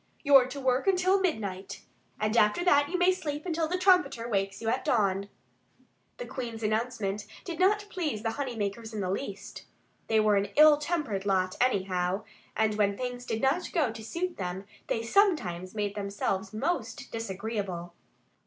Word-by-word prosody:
You're 275 -4 +7
to 280 - -7
work 260 +4 +1
until 375 +1 +3
midnight. 200 - -3 0.4
And 215 +1 0
after 210 +10 +3
that 290 -4 +4
you 365 - -1
may 360 +1 +4
sleep 300 -4 -4
until 330 -2 0
the 360 +3 -1
trumpeter 360 -11 +3
wakes 195 -3 -1
you 225 - -5
at 225 - 0
dawn." 200 -3 +1 0.9
The - - -5
Queen's 230 -3 -6
announcement 215 -2 -1 0.2
did 340 -3 -5
not 410 +3 +3
please 295 - -2
the 225 - 0
honey 265 -1 -4
makers 220 +2 -4
in 210 - -2
the 185 -1 -1
least. 200 -2 -6 0.4
They 220 -1 +3
were 210 -1 +4
an 200 +1 +1
ill 305 0 +8
tempered 295 - -2
lot, 185 -1 +1
anyhow. 190 -4 +1 0.3
And 215 -1 +1
when 200 -1 +2
things 245 -1 -5
did 225 +2 -2
not 270 +7 +1
go 300 -9 +2
to 220 0 -9
suit 340 +9 -3
them 185 +1 -4 0.2
they 225 - -1
sometimes 225 - +1
made 205 -1 -1
themselves 200 -1 -2
most 275 +11 -3
disagreeable. 200 -5 -4
225 Hz, 170 wpm, -29 LUFS, 200-300 Hz, 0.9 s, ill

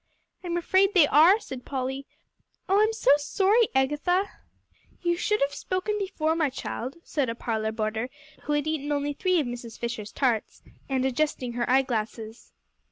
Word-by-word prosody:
"I'm 345 -1 -2
afraid 385 +3 +2
they 340 -5 +7
are," 325 +9 +6
said 260 - -8
Polly; 265 0 -4 0.6
"oh, 390 +2 +4
I'm 435 +1 +3
so 440 -11 +2
sorry, 400 +9 +2
Agatha!" 295 +9 +1 0.7
"You 345 0 +2
should 420 +4 0
have 280 +1 +1
spoken 375 +3 -2
before, 320 -5 -1
my 315 -3 +1
child," 260 0 -5
said 280 -6 -1
a 230 - -3
parlor 220 -2 -2
boarder, 220 +2 -2 0.4
who 295 - 0
had 295 0 +1
eaten 300 -2 -2
only 290 0 -1
three 365 +3 +1
of 300 - 0
Mrs. 240 -2 -7
Fisher's 230 -3 -5
tarts, 240 -6 -1 0.3
and 260 -1 0
adjusting 265 -2 -1
her 240 0 -2
eyeglasses. 230 -3 -1
285 Hz, 165 wpm, -26 LUFS, 245-355 Hz, 0.7 s, they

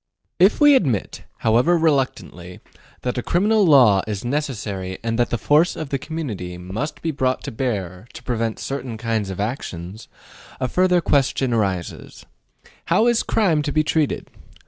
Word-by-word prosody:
If 190 +4 +4
we 295 -1 +7
admit, 135 - 0 0.2
however 120 +10 +4
reluctantly, 130 - -1 0.4
that 125 0 -2
a - - -2
criminal 210 - +2
law 125 - +6
is 105 0 -4
necessary 105 -9 -3
and 115 0 -2
that 120 - +2
the 120 - -1
force 150 +9 +3
of 155 -3 -6
the 140 - -2
community 115 - -5
must 95 - -5
be 165 - 0
brought 130 -3 -1
to - - -5
bear 105 -5 -4
to - - -11
prevent 115 -3 -2
certain 130 -4 -5
kinds 110 -3 -2
of 95 - -6
actions, 100 -3 -5 0.5
a 130 - -1
further 180 +4 +2
question 135 -4 +1
arises: 95 -6 -3 0.6
How 220 - +3
is 240 -1 +3
crime 175 -9 +1
to 145 0 -3
be 155 +1 +2
treated? 155 -1 -1
125 Hz, 160 wpm, -21 LUFS, 105-155 Hz, 0.6 s, we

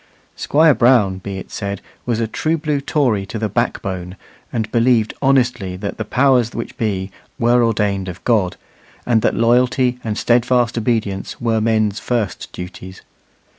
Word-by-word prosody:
Squire 155 +1 +4
Brown, 115 -7 +3
be 95 +1 -6
it 95 - -9
said, 100 -1 -4 0.3
was 115 -2 0
a 115 - +1
true 155 +9 -1
blue 150 -2 -1
Tory 130 -8 +1
to 110 - -5
the 110 0 -1
backbone, 95 -4 -2 0.4
and 110 -3 -2
believed 115 -2 +2
honestly 125 -9 +1
that 100 +2 -5
the - - -1
powers 125 -1 +2
which 115 - -5
be 100 -4 -2 0.3
were 120 +1 +3
ordained 105 -4 0
of 90 0 -8
God, 105 -7 +1 0.5
and 115 -2 +2
that - - +1
loyalty 125 +2 +2
and 110 -2 -3
steadfast 120 +1 +2
obedience 110 -4 -2
were 115 -2 0
men's 110 -2 +1
first 115 -5 -3
duties. 90 +1 -9
115 Hz, 155 wpm, -19 LUFS, 100-125 Hz, 0.5 s, Squire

